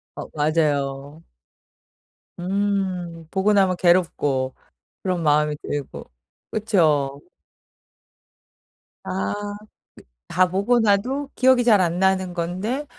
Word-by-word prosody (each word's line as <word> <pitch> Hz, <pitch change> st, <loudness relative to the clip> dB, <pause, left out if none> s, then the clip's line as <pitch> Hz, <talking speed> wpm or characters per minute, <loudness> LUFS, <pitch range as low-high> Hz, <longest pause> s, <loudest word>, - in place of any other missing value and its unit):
어 -, -, -7 dB
맞아요. 145 Hz, -1 st, -1 dB, 1.2 s
음 185 Hz, -3 st, -2 dB
보고 200 Hz, +2 st, +2 dB
나면 190 Hz, -3 st, +3 dB
괴롭고 145 Hz, -7 st, +1 dB, 0.5 s
그런 180 Hz, -3 st, -1 dB
마음이 150 Hz, -1 st, +2 dB
들고 145 Hz, -, -6 dB, 0.4 s
그쵸? 155 Hz, -10 st, +1 dB, 1.8 s
아 95 Hz, +1 st, -2 dB, 0.2 s
그 210 Hz, -, -18 dB, 0.7 s
다 185 Hz, +1 st, +4 dB
보고 200 Hz, +6 st, +2 dB
나도 245 Hz, +7 st, +1 dB
기억이 255 Hz, -1 st, +4 dB
잘 210 Hz, -5 st, +5 dB
안 175 Hz, 0 st, 0 dB
나는 190 Hz, -1 st, +1 dB
건데 185 Hz, -, -3 dB
180 Hz, 170 characters per minute, -22 LUFS, 150-200 Hz, 1.8 s, 잘